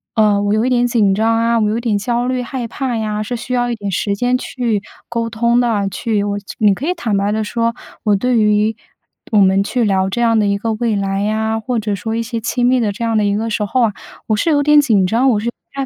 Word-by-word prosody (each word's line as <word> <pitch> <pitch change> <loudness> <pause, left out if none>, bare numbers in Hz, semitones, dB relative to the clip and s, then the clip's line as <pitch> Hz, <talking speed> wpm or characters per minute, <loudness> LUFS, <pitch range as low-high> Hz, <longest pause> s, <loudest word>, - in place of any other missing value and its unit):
呃， 210 -2 +3
我 205 0 +1
有 215 +2 +1
一 255 - +1
点 245 -1 +2
紧 210 -5 +2
张 225 +2 +2
啊， 230 0 +2
我 210 -1 +1
有 220 - -1
一 - - -3
点 225 -4 0
焦 240 +3 -1
虑、 255 -1 -1
害 245 -1 -4
怕 250 -1 -3
呀。 215 -1 -2
“是 245 +3 -4
需 250 +2 -5
要 245 0 0
一 - - -1
点 205 -2 -5
时 200 +2 -1
间 245 +4 +1
去 230 -6 -2 0.3
沟 230 -1 -2
通 235 +2 +2
的。 215 -5 +1
去 205 +2 -1
我 205 0 -2
去 200 - -9
你 210 -2 +4
可 275 - -5
以 360 - +1
坦 230 - -2
白 200 +1 0
地 220 +1 -1
说， 230 +2 -1 0.3
“我 210 -2 +3
对 245 +4 +1
于 210 0 +2 0.6
我 215 - +3
们 195 0 +4
去 240 +4 -1
聊 190 -2 +1
这 240 - -1
样 230 -1 +3
的 210 - +2
一 200 0 +1
个 225 +1 -1
未 220 -1 -1
来 195 0 -1
呀， 220 +1 -1
或 245 +1 -2
者 210 -2 -2
说 220 +4 -4
一 230 - -1
些 230 0 -4
亲 240 +2 -1
密 255 0 +3
的 220 -4 0
这 205 +4 -6
样 225 -1 +1
的 210 - +2
一 200 0 +1
个 225 +2 -2
时 210 -1 -1
候 255 +5 0
啊， 210 - -5 0.3
我 215 - +2
是 325 - 0
有 290 -1 +3
点 300 0 +6
紧 210 -9 +2
张， 240 +6 +2
我 215 - +1
是 225 - -4
有 - - 0
点 275 +2 -7
225 Hz, 300 characters per minute, -17 LUFS, 205-240 Hz, 0.6 s, 点